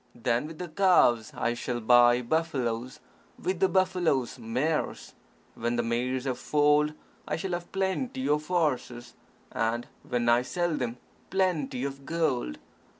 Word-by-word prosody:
Then, 120 +3 0
with 160 0 -10
the 180 - -5
calves, 155 - +3
I 120 - 0
shall 120 0 -3
buy 120 +1 +5
buffaloes; 130 -5 -1 0.4
with 185 -1 -2
the 190 0 +3
buffaloes, 175 -10 +1
mares. 130 +8 -2 0.4
When 120 +1 -2
the 120 - 0
mares 125 +2 -1
have 130 -2 -2
foaled, 150 0 +3 0.3
I 150 - -1
shall 180 +4 -4
have 175 0 -4
plenty 240 +8 -1
of 150 +1 +1
horses; 145 -8 -1 0.4
and 115 +1 -1 0.2
when 120 -1 -2
I 120 +1 +5
sell 175 +5 -1
them, 125 -3 -3 0.3
plenty 170 -9 0
of 140 0 -5
gold. 150 - -1
135 Hz, 145 wpm, -28 LUFS, 120-170 Hz, 0.4 s, buy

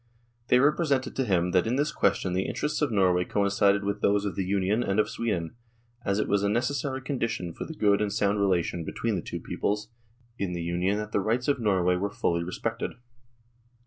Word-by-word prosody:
They 125 - +5
represented 145 -1 +2
to 135 - 0
him 90 -4 +1
that 90 +3 +2
in 120 - +1
this 145 +2 +1
question 95 -7 +1
the 95 +1 0
interests 150 +1 -2
of 145 -4 +1
Norway 90 -4 +3
coincided 100 +1 +2
with 100 +1 -2
those 100 0 +2
of 95 -4 -3
the 95 - -1
Union 100 +4 +1
and 100 -2 0
of 105 - +3
Sweden, 90 -8 -2 0.5
as 100 -1 0
it 105 - 0
was 100 -1 +2
a 100 - +1
necessary 130 +4 -1
condition 115 - -2
for - - -6
the 160 - -8
good 100 -4 +3
and 105 -1 0
sound 100 0 +1
relation 90 -3 +1
between 115 +7 -2
the 90 - -1
two - - -6
peoples 105 +1 -2 0.5
in 95 -3 -2
the 85 -1 -3
Union 90 +4 0
that 105 0 -4
the - - +1
rights 115 +5 0
of 140 -2 +2
Nor 100 -5 +2
way 90 0 +3
were 100 +3 -1
fully 85 -3 0
respected. 115 +6 -3
100 Hz, 210 wpm, -27 LUFS, 95-115 Hz, 0.5 s, They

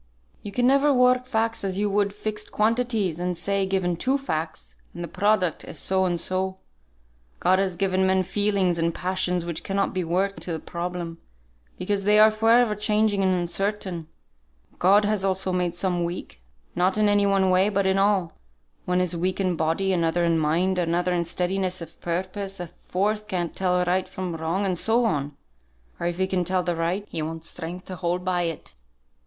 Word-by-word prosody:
"You 205 - -7
can 245 +4 +1
never 275 +3 +4
work 250 -1 +3
facts 225 -2 -1
as 190 -1 -2
you 205 +1 +1
would 200 0 +1
fixed 210 +1 -5
quantities, 220 -6 +1
and 180 0 -2
say, 195 +2 0
given 185 -2 0
two 260 +10 +1
facts, 155 - -4 0.2
and 175 - -5
the - - -4
product 190 -1 +1
is - - -8
so 190 0 +1
and 175 -2 0
so. 185 +2 -2 0.8
God 185 - +3
has 190 -2 0
given 190 +1 +1
men 190 0 +3
feelings 195 -3 +1
and 165 0 0
passions 180 -1 -1
which 170 -2 -4
cannot 195 0 -1
be 185 -1 -1
worked 190 +4 -1
into 175 - -5
the 160 - -3
problem, 170 -1 -5 0.6
because 200 +1 -1
they 210 +1 +4
are 215 +1 +7
for 220 +1 +1
ever 235 -1 +5
changing 210 -1 +1
and 185 -1 +2
uncertain. 180 -1 -2 0.7
God 200 +3 +5
has 210 -2 0
also 190 -1 0
made 180 -1 0
some 175 -1 0
weak; 170 - -6 0.3
not 185 +3 +1
in 215 0 +3
any 205 0 +3
one 195 -1 +3
way, 185 +2 +4
but 200 -1 0
in 190 0 +2
all. 195 -4 +2 0.5
One 180 0 +1
is 180 -1 -1
weak 185 +3 -1
in 185 -2 +1
body, 165 +5 0
another 170 0 +1
in 165 -1 +2
mind, 175 +5 +1
another 175 +1 +1
in 170 -1 0
steadiness 185 +2 -1
of 165 -1 -11
purpose, 190 +3 -3
a 175 - -3
fourth 210 +5 -2
can't 180 -4 -2
tell 180 -1 +1
right 185 +1 +1
from 185 -3 -5
wrong, 165 +5 -1
and 185 -3 0
so 235 +2 +2
on; 145 -6 -1 0.6
or 170 - -1
if 175 0 -2
he 190 - +2
can 185 -1 0
tell 185 +1 0
the 175 0 -1
right, 170 +5 -1
he 160 - -4
wants 160 +1 -5
strength 175 +3 -6
to 185 - -6
hold 180 +1 -2
by 180 -1 +1
it. 165 -2 -5
185 Hz, 195 wpm, -25 LUFS, 175-200 Hz, 0.8 s, are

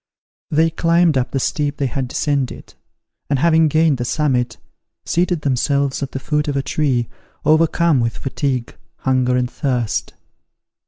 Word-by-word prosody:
They 160 +2 +2
climbed 165 -1 +3
up 130 -1 0
the 135 - -1
steep 145 +2 -1
they 140 - 0
had 130 +1 -2
descended; 140 0 -2 0.6
and 140 - +2
having 160 +2 +4
gained 155 -2 +2
the - - -1
summit, 125 -2 0 0.5
seated 175 -1 0
themselves 140 0 0
at 140 - -3
the 135 - -4
foot 150 +2 -1
of 140 -1 -1
a 135 - 0
tree, 130 -7 0 0.4
overcome 165 -1 +3
with 115 -1 -1
fatigue, 135 -3 -3 0.2
hunger 130 -1 +1
and 125 0 +1
thirst. 125 -4 -2
140 Hz, 150 wpm, -19 LUFS, 130-155 Hz, 0.6 s, having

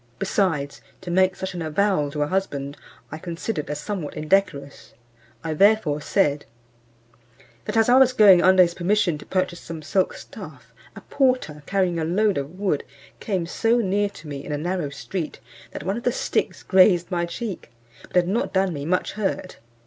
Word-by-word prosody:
Besides, 150 -5 -1 0.2
to 180 -2 -6
make 185 +1 +3
such 190 -1 -5
an 175 - -5
avowal 160 -1 +1
to 150 +1 -1
a - - -2
husband, 145 -6 -2 0.4
I 155 - -6
considered 170 0 -4
as 150 - -3
somewhat 190 -8 -5
indecorous; 150 -4 -1 0.5
I 160 -1 -2
therefore 185 -5 +3
said, 150 -4 +1 1.2
"That - - -2
as 225 - +4
I 250 +2 +6
was 260 -1 +6
going, 205 -7 +7
under 185 0 +6
his 170 -1 -1
permission, 180 -3 +1
to - - -13
purchase 185 -2 -1
some 165 -2 -8
silk 190 +5 0
stuff, - - -11 0.2
a - - -10
porter, 255 - 0
carrying 185 -3 0
a - - -1
load 195 +3 +1
of 145 +6 -7
wood, 190 -8 0 0.4
came 190 -5 -2
so 225 +7 +1
near 205 -2 +1
to 165 -5 -13
me, 140 -1 -6
in - - -7
a 145 - -1
narrow 175 -1 -2
street, 155 +2 -5 0.3
that - - -8
one 195 +4 -2
of 240 - -6
the 245 - +2
sticks - - -2
grazed 185 -2 +4
my 175 -1 0
cheek; 205 - -6 0.4
but - - -16
had 180 -1 +4
not 215 +6 -1
done 190 -2 +1
me 145 -2 -5
much 180 +3 0
hurt." 195 -3 -3
180 Hz, 185 wpm, -23 LUFS, 155-200 Hz, 1.2 s, going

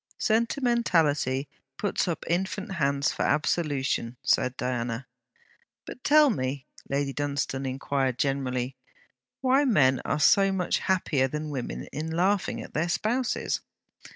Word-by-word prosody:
'Sentimentality 215 - +1 0.3
puts 205 -1 -1
up 170 - -3
infant 190 +3 -1
hands 140 -2 +1
for - - -5
absolution,' 145 -6 0
said 125 +1 +2
Diana. 125 0 -2 0.8
'But 250 - -10
tell 300 -1 +6
me,' 130 - -3 0.2
Lady 140 0 -1
Dunstane 140 -2 -2
inquired 130 -1 -1
generally, 130 -2 -1 0.7
'why 265 +2 +4
men 140 - +3
are 150 - -1
so 195 +4 +5
much 185 -2 0
happier 155 -8 +1
than 150 +2 -4
women 120 - -4
in 155 +2 -3
laughing 185 +5 0
at - - -12
their 165 +3 0
spouses?' 240 +7 -1
145 Hz, 125 wpm, -27 LUFS, 135-195 Hz, 0.8 s, tell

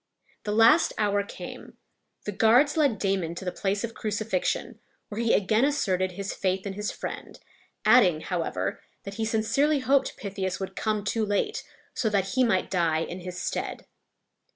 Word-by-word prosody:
The 210 - -1
last 225 +10 +5
hour 205 -1 +2
came. 200 - -9 0.5
The 210 - -2
guards 230 +8 +4
led 285 -8 +2
Damon 190 -4 -1
to 190 - -7
the 180 - -1
place 200 +2 -1
of 230 -1 -4
crucifixion, 215 -3 -2 0.3
where 215 +2 -3
he 230 -1 +2
again 215 +4 +2
asserted 185 -10 +1
his 195 +1 -4
faith 190 0 -1
in 200 - -3
his 210 +2 -3
friend, - - -7 0.5
adding, 205 -9 +5
however, 160 - -2 0.2
that 200 - -7
he - - +1
sincerely 225 +8 +2
hoped 270 +1 +1
Pythias 190 -2 -3
would 190 0 -5
come 215 -1 -1
too 220 +2 0
late, 205 -1 -1 0.3
so 225 - 0
that 195 -2 0
he 255 +6 +2
might 210 -6 +1
die 165 -4 +1
in 175 +2 -5
his 180 0 -7
stead. - - -4
205 Hz, 170 wpm, -27 LUFS, 185-225 Hz, 0.5 s, last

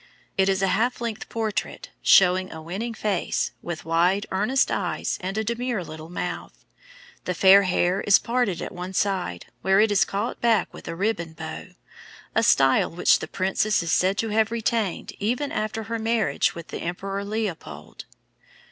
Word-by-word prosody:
It 190 0 +3
is 195 0 +1
a 195 - +3
half 245 +3 0
length 230 -2 -5
portrait, 220 -3 -3
showing 185 0 +5
a 160 - -7
winning 195 +9 -5
face, 205 -5 -1
with 170 -3 -6
wide, 175 +5 +2
earnest 215 +8 +1
eyes, - - -2
and 190 +3 -4
a 220 - +1
demure 235 -2 -2
little 160 0 -9
mouth. 175 0 -6 0.6
The 180 - -2
fair 195 +2 +7
hair 185 0 +1
is 200 - +6
parted 230 -7 -1
at - - -6
one 180 +1 -7
side, 185 - -1 0.2
where 190 0 +3
it 215 0 +4
is 195 -1 +4
caught 200 +1 -3
back 225 -5 +2
with - - -11
a - - -4
ribbon 180 -4 -2
bow, 160 0 -8 0.6
a - - +3
style 135 -1 +4
which 170 - +3
the - - -6
princess 195 +1 0
is 165 - -2
said 190 +4 +2
to 225 - -1
have 220 +1 +2
retained 225 -4 -1
even 245 +7 -1
after 215 +1 -2
her 230 +1 -4
marriage 225 -1 +1
with 170 -1 -9
the - - -6
Emperor 195 +3 -4
Leopold. 200 - -5
195 Hz, 175 wpm, -24 LUFS, 180-220 Hz, 0.6 s, fair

